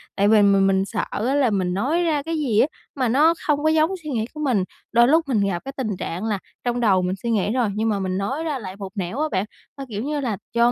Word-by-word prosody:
Tại 200 0 +2
vì 215 0 +6
mình 195 -1 +4
mình 190 0 +2
sợ 210 +1 -2
á, 250 +6 0
là 275 -5 +3
mình 185 -3 0
nói 285 - +1
ra 300 -4 0
cái 325 0 -2
gì 245 -8 +1
á, 280 - +5 0.3
mà 260 -3 0
nó 300 +7 +5
không 295 -1 +1
có 315 - +4
giống 315 +2 +3
suy 305 - -6
nghĩ 225 -5 -1
của 305 - -9
mình, 255 -10 +1 0.3
đôi 235 +1 +5
lúc 320 +3 +3
mình 245 -6 +1
gặp 185 -3 -1
cái 275 - -4
tình 215 -8 -2
trạng 175 +4 -4
là 210 -3 -1 0.2
trong 245 0 -1
đầu 195 -5 +3
mình 180 +1 -1
suy 235 - 0
nghĩ 210 -1 +1
rồi, 245 -4 +1
nhưng 220 +1 0
mà 205 -2 0
mình 185 -1 -2
nói 265 +11 -2
ra 300 -5 -2
lại 190 -4 -7
một 195 -1 -7
nẻo 195 +6 -3
á 310 - +1
bạn. 185 +2 0 0.3
Ơ, 275 - -7
kiểu 210 0 -4
như 295 +2 -2
là 235 -8 -2 0.2
do 235 +1 +4
230 Hz, 285 wpm, -22 LUFS, 200-285 Hz, 0.3 s, vì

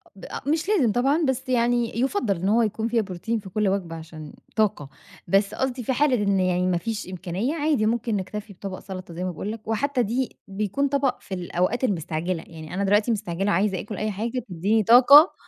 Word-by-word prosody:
ب 195 - -11
أ - - -6
مش 325 +5 0
لازم 290 - +3
طبعًا 275 +8 +2
بس 265 0 -2
يعني 240 -1 +1
يُفَضَّل 255 - +1
إن 185 +4 -1
هو 230 +2 +4
يكون 220 +1 -1
فيها 235 -1 +2
بروتين 205 +3 -3
في 195 -2 -10
كل 210 +1 0
وجبة 180 -4 -2
عشان 160 -2 -9 0.2
طاقة. 200 -10 0 0.4
بس 195 +3 +2
قصدي 260 -2 -2
في 260 - 0
حالة 280 0 +3
إن 200 -1 +2
يعني 180 0 +1
ما 180 - +2
فيش 210 +3 -4
إمكانية، 190 - -3
عادي 290 -8 +1
ممكن 230 0 0
نكتَفي 205 +2 -5
بطبق 190 0 -7
سلطة 185 -3 -8
زي 175 +2 -4
ما 185 - -1
باقول 200 +5 -5
لك، 220 -1 -9
وحتى 255 +3 0
دي 245 +4 -2
بيكون 210 +8 -1
طبق 275 -2 0
في 195 - -9
الأوقات 185 +6 -1
المستعجلة. 165 -4 -1
يعني 160 0 -10
أنا 200 +2 -1
دلوقتي 210 +4 +3
مستعجلة 195 -2 -1
وعايزة 190 0 +1
آكُل 210 -1 -6
أي 215 0 -1
حاجة 230 +4 -3
تديني 200 +6 +1
طاقة. 270 - +8
210 Hz, 205 wpm, -24 LUFS, 185-245 Hz, 0.4 s, طاقة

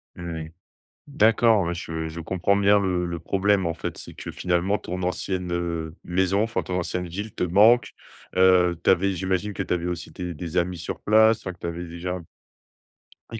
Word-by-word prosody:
Oui. 80 -2 -6 0.6
D'accord, 115 -4 +4
ouais 85 +1 -2
je 80 -2 -4
je 80 +2 -7
comprends 95 +3 +1
bien 100 +1 +5
le 90 -2 0
le 85 -1 -4
problème 95 +2 +1
en 85 - -1
fait, - - -5
c'est - - -10
que - - -7
finalement 90 +3 0
ton 90 +1 -5
ancienne, 90 0 -2
heu, 85 -2 -3
maison, 95 +3 +1
enfin 115 +1 -2
ton 90 0 -3
ancienne 90 0 -3
ville 100 +5 -6
te - - -3
manque. 105 +6 +5 0.5
Heu, 90 -2 +4
tu - - +1
avais 95 +1 +4
j'imagine 95 +3 -1
que 95 - -3
tu 90 - 0
avais 85 0 -3
aussi 90 -2 -5
tes 90 -1 -5
des 85 +1 -6
amis 90 0 0
sur 85 - -5
place, 110 +1 +5
enfin 95 - -5
que - - -19
tu - - -5
avais 85 +1 -5
déjà 85 +2 -5
m 85 - -9 1.1
et 115 - -4
90 Hz, 200 wpm, -24 LUFS, 85-100 Hz, 1.1 s, bien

